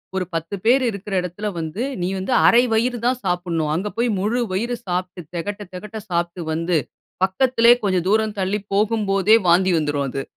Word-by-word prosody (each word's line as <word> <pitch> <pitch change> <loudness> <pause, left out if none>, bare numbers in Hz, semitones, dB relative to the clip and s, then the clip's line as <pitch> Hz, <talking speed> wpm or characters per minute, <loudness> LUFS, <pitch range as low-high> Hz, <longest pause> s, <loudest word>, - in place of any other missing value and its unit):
ஒரு 190 -1 -1
10 165 +4 -3
பேர் 255 +3 +4
இருக்குற 200 -1 -6
எடத்துல 180 +4 -5
வந்து, 165 +8 -3 0.2
நீ 175 - 0
வந்து 190 +7 -2
1/2 235 - +6
வயிறு 240 +2 +1
தான் 250 0 +1
சாப்டணும். 175 -4 -1
அங்கே 195 +5 -2
போய் 240 +1 +1
முழு 220 +6 0
வயிறு 235 +6 -1
சாப்ட்டு 180 0 -3
தெகட்ட 200 +5 -4
தெகட்ட 210 +4 -7
சாப்ட்டு 170 0 -2
வந்து 165 +1 0 0.5
பக்கத்துலயே 235 +4 +4
கொஞ்சம் 185 -3 +1
தூரம் 215 0 +1
தள்ளி 195 +2 0
போகும்போதே 210 0 +3
வாந்தி 185 +2 +4
வந்துரும் 145 -2 -1
அது. 135 +2 -4
190 Hz, 170 wpm, -21 LUFS, 175-220 Hz, 0.5 s, 1/2